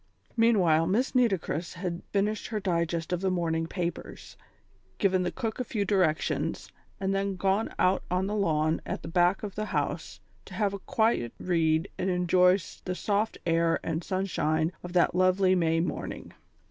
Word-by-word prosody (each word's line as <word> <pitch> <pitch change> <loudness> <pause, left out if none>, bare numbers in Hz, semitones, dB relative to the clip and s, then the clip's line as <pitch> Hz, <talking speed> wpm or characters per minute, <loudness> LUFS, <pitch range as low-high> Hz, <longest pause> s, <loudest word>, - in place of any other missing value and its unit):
Meanwhile, 180 -9 +4
Miss 230 +9 +1
Nitocris 190 - 0
had 180 -1 -4
finished 210 +2 0
her 215 - -2
digest 170 -3 -1
of 180 - -1
the 190 - +1
morning 165 -3 0
papers, 175 0 -5 0.6
given 185 -2 +2
the 180 - -1
cook 225 0 -4
a - - 0
few 215 -4 -2
directions, 185 -6 0 0.3
and 195 0 0
then 195 0 -1
gone 195 +4 +1
out 185 +1 +3
on 180 +1 0
the 205 - -2
lawn 160 -6 +1
at - - -5
the - - -6
back 175 +4 +2
of 205 -2 -4
the 215 +1 -3
house - - -3 0.3
to - - -10
have 205 -2 0
a 200 - -4
quiet 220 - 0
read 165 -1 +1
and 185 - 0
enjoy 180 +1 +4 0.3
the 185 - -3
soft 205 +4 -1
air 165 0 +2
and 160 +1 -2
sunshine 165 -4 0
of 180 0 -8
that 180 - +3
lovely 185 +1 +3
May 165 -2 +2
morning. 165 -2 -4
185 Hz, 170 wpm, -28 LUFS, 165-200 Hz, 0.6 s, Meanwhile